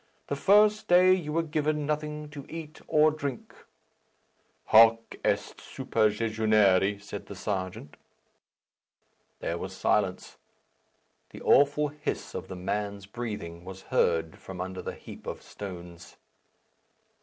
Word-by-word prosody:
The 140 - 0
first 210 +6 +4
day 180 +1 +6
you 170 -5 -2
were 165 +2 +1
given 150 -1 -1
nothing 150 0 -3
to 145 -2 -8
eat 160 -1 -8
or 155 0 +4
drink." 140 -5 -5 1.1
"Hoc 115 +1 +5
est - - -1
superjejunare," 105 -2 +2
said 100 0 -8
the 100 - -8
serjeant. 95 -6 -4 1.4
There 85 +1 -2
was - - -6
silence, - - 0 0.9
the - - -11
awful 145 +2 +4
hiss 150 +1 -5
of - - -5
the 95 - -7
man's 100 +2 -3
breathing 100 -7 -6
was 95 +1 -10
heard 80 -1 +1
from 95 -2 -9
under 95 0 -4
the - - -6
heap - - -12
of - - -6
stones. 90 -3 -9
110 Hz, 120 wpm, -28 LUFS, 95-150 Hz, 1.4 s, day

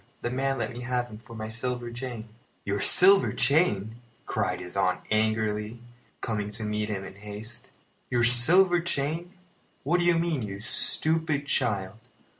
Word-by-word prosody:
The 120 - -1
man 135 +1 0
let 120 - -2
me 120 - -7
have 125 -1 -2
him 105 - -10
for 115 0 -13
my 110 -1 -5
silver 120 +1 -3
chain." 120 -2 -6 0.4
"Your 100 0 -1
silver 195 - +6
chain!" 115 - +2 0.3
cried 100 -4 -1
his 90 0 -7
aunt 95 -2 +1
angrily, 110 +1 0 0.4
coming 105 -2 -2
to 110 +1 -6
meet 105 0 -2
him 100 -2 -3
in 95 0 -10
haste. 105 +2 -7 0.4
"Your 120 -1 +2
silver 175 +10 +5
chain! 165 +2 -2 0.5
What 170 +6 +2
do 175 - +1
you 170 -1 +4
mean, 165 -5 0
you 100 -2 -5
stupid 155 +6 0
child? 105 -7 -1
115 Hz, 160 wpm, -27 LUFS, 105-140 Hz, 0.5 s, silver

